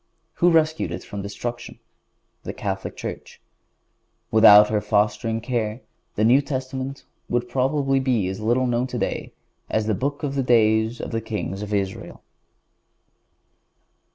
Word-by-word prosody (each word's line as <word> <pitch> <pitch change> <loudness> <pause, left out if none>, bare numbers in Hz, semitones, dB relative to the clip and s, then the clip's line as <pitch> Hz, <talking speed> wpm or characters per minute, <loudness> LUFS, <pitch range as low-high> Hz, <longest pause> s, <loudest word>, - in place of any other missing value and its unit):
Who 175 - +6
rescued 160 -1 +2
it - - -5
from 100 - -7
destruction? 120 +4 -6 0.6
The - - -6
Catholic - - -4
Church. - - -7 0.9
Without 105 -1 +8
her 105 -1 0
fostering 105 +2 0
care 120 -1 -2 0.3
the 105 - 0
New 125 +5 +5
Testament 130 -1 -5 0.2
would 120 0 0
probably 135 +2 +1
be 125 -7 +1
as 95 +1 -4
little 120 +4 +1
known 120 +1 0
today - - -3 0.4
as 110 -1 0
"the 110 - +1
Book 140 +9 -3
of 140 -2 -2
the 140 - 0
days 110 -1 +2
of - - -6
the 115 -1 -2
kings 105 -3 -4
of 105 0 -6
Israel." 100 -2 -3
120 Hz, 140 wpm, -23 LUFS, 105-130 Hz, 0.9 s, Without